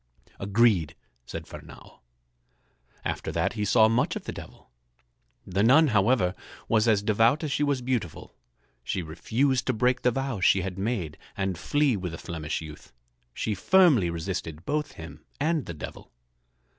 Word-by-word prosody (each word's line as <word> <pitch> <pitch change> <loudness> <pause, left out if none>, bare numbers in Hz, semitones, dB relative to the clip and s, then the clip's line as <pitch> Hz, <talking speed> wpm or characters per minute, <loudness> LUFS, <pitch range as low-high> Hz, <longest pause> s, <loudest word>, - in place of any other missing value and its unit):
"Agreed," 100 -5 +2 0.3
said - - -6
Fernâo. - - -13 1.1
After - - -3
that 85 +4 0
he 105 -2 -3
saw 110 +2 +5
much 115 +3 +1
of - - -5
the - - -5
Devil. - - -12 0.7
The 95 +2 -1
nun, 140 +8 +6
however, 100 -3 +2 0.3
was 110 0 +2
as 105 -3 +3
devout 115 +8 +3
as 150 - -2
she 145 - -1
was 140 -3 +1
beautiful. 115 -11 -3 0.5
She 90 +8 -2
refused 125 - 0
to 130 - +2
break 125 +2 +1
the 125 - +3
vows 135 -5 -3
she 95 - +5
had 95 -1 -4
made 95 -8 -3 0.2
and 95 -2 -1
flee 145 - +1
with 90 -4 -4
the - - -5
Flemish 80 -2 -4
youth. 75 -1 -11 0.4
She 105 - -2
firmly 130 - +4
resisted 85 -1 -5
both 150 0 -2
him 80 0 -11 0.2
and 155 0 0
the 85 - -5
Devil. - - -9
110 Hz, 155 wpm, -27 LUFS, 90-130 Hz, 1.1 s, nun